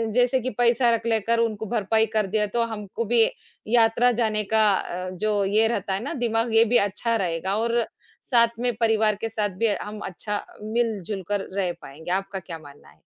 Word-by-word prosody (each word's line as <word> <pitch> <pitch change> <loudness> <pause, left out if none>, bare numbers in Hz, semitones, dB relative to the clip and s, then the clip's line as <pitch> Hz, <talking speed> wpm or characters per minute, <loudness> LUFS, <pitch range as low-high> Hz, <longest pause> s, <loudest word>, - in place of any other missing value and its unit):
जैसे 250 +1 +3
कि 255 - -2
पैसा 240 0 +3
रख 230 0 -1
लेकर 225 +1 +1
उनको 220 -2 -1
भरपाई 220 0 +1
कर 215 -2 +1
दिया, 210 +2 +1
तो 235 +3 0
हमको 220 0 -5
भी 230 +1 +4 0.4
यात्रा 235 +1 +4
जाने 215 -2 0
का 220 -1 +5
अ, 185 0 -3
जो 205 +2 0
ये 215 +3 +3
रहता 200 -4 -2
है 190 - -1
ना, 285 - -4
दिमाग़ 230 -4 0
ये 225 0 +6
भी - - +7
अच्छा 230 +4 -1
रहेगा 175 +3 -1
और 235 +1 +1 0.5
साथ 235 -1 +3
में 245 -1 0
परिवार 220 -2 +3
के 225 - -2
साथ 210 -2 -1
भी 230 - +3
हम 210 0 -7
अच्छा 205 +3 -4 0.2
मिल-जुलकर 205 -3 -2
रह 185 -3 +1
पाएँगे। 160 +5 -8
आपका 195 +1 -2
क्या 170 -3 -8
मानना 145 -2 -15
है? - - -24
220 Hz, 190 wpm, -24 LUFS, 200-230 Hz, 0.5 s, भी